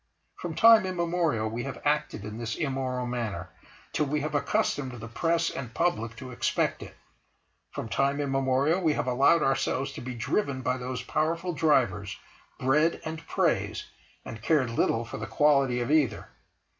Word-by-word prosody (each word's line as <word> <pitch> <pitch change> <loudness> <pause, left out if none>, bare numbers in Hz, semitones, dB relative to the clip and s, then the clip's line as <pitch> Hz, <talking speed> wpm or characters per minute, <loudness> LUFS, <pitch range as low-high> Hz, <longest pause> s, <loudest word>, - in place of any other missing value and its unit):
From - - -5
time 225 -4 +7
immemorial 170 -10 0
we 115 +2 -3
have - - -6
acted 100 - 0
in 105 +2 -6
this 115 -1 -3
immoral 130 -4 -2
manner, 115 -8 -4 0.4
till 150 - +1
we 150 +1 -1
have 150 0 -3
accustomed 145 -2 0
the 115 -2 -8
Press 165 +7 0
and 120 -4 -7
Public 115 -10 0
to 130 +2 -9
expect 120 - 0
it. - - -10 0.7
From - - -5
time 140 +6 +1
immemorial 135 +4 +1
we 160 -4 +2
have - - -1
allowed 135 +6 +4
ourselves 135 0 0
to - - -7
be 125 0 -6
driven 130 - -1
by 125 0 0
those 125 0 -4
powerful 165 +6 -1
drivers, 120 -11 +1 0.4
Bread, 150 +6 +2
and 160 0 -5
Praise, - - 0 0.4
and 110 - -8
cared 130 -2 +2
little 115 0 +1
for - - -7
the 110 - -5
quality 135 0 +3
of 120 +4 -2
either. 140 -9 +1
135 Hz, 165 wpm, -28 LUFS, 120-155 Hz, 0.7 s, time